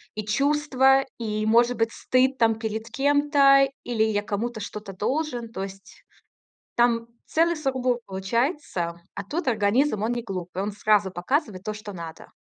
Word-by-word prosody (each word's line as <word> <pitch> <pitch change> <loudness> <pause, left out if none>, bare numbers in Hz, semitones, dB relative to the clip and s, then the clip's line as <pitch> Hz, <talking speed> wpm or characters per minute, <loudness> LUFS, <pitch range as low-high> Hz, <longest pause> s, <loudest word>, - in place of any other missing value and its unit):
и 215 -1 -4
чувства, 270 +2 +3 0.2
и, 215 -2 -2
может 235 +3 +4
быть, 225 0 +1
стыд, 260 +1 +1
там, 225 -1 +3
перед 220 0 -4
кем-то, 280 -1 +4 0.2
или 230 -3 0
я 210 -2 0
кому-то 220 +3 -3
что-то 205 -1 -7
должен, 245 +2 -2
то 190 - -4
есть 195 0 -11 0.8
там 235 -1 +3 0.2
целый 335 +1 +2
сургуб 260 -4 0
получается. 190 - -2
А 200 - -4
тут 300 - -4
организм- 215 +2 +2
он 230 +2 0
не 240 -1 -2
глупый: 185 -2 -5
он 205 +1 -3
сразу 205 -2 +2
показывает 190 - -1
то, 215 +1 -4
что 210 -1 -8
надо. 165 -3 -9
230 Hz, 155 wpm, -25 LUFS, 205-270 Hz, 0.8 s, может